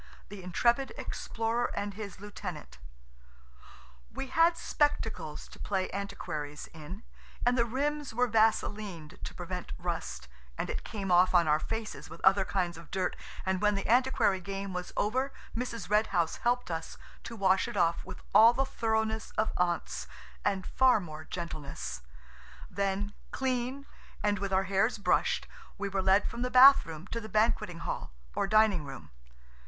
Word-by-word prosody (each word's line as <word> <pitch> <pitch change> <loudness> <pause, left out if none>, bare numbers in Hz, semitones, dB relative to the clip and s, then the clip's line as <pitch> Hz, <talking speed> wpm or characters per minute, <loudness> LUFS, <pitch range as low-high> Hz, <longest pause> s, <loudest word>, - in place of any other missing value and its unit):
THE 205 -1 -8
INTREPID 235 +9 +1
EXPLORER 230 +1 -2
AND 205 0 -2
HIS 200 -2 -7
LIEUTENANT 180 - -7 1.3
WE 270 - -5
had 335 +4 +4
spectacles 225 - -1
to - - -14
play 190 -2 -1
antiquaries 175 -7 -5
in, 165 +7 -9 0.4
and 245 +1 +4
the 235 -2 +3
rims 290 +4 -1
were 245 +2 +2
vaselined 210 -6 0
to - - -6
prevent 180 0 -5
rust, 165 - -4 0.3
and - - -2
it - - -4
came 195 -4 -4
off 180 +1 +5
on 170 -2 +5
our 150 0 +4
faces 225 +5 -5
with - - -10
other 195 +1 +6
kinds 175 -4 -1
of 165 - -14
dirt, 185 -1 -1 0.3
and 190 -1 0
when 210 -1 +3
the 195 - -2
antiquary 245 -5 +3
game 195 +1 -5
was 180 0 -4
over 260 +6 +1 0.2
Mrs. 230 -4 -3
Red 210 +2 +3
House 170 -4 0
helped 245 -4 0
us 165 0 -4 0.3
to 230 - -7
wash 190 -2 +3
it - - -5
off 170 -2 +2
with - - -10
all 225 +4 +8
the 270 +2 +1
thoroughness 220 -3 -1
of 215 - +2
aunts, 175 -1 -1 0.4
and 195 -2 0
far 260 -4 +4
more 155 -4 -8
gentleness. 155 - -5 0.7
Then, 200 +1 -1 0.2
clean 260 +1 -2 0.4
and 205 -1 +2
with 200 0 -3
our 190 0 +3
hairs 195 +5 +1
brushed, 205 - +1 0.3
we 200 - -2
were 195 0 0
led 190 +2 +4
from 235 - -5
the 250 - 0
bath 265 -1 +8
room 160 +1 -7
to 230 - -2
the 220 - -8
banqueting 215 -6 +1
hall - - -4 0.2
or - - 0
dining 215 -5 +4
room. 135 - -9
200 Hz, 160 wpm, -30 LUFS, 180-230 Hz, 1.3 s, all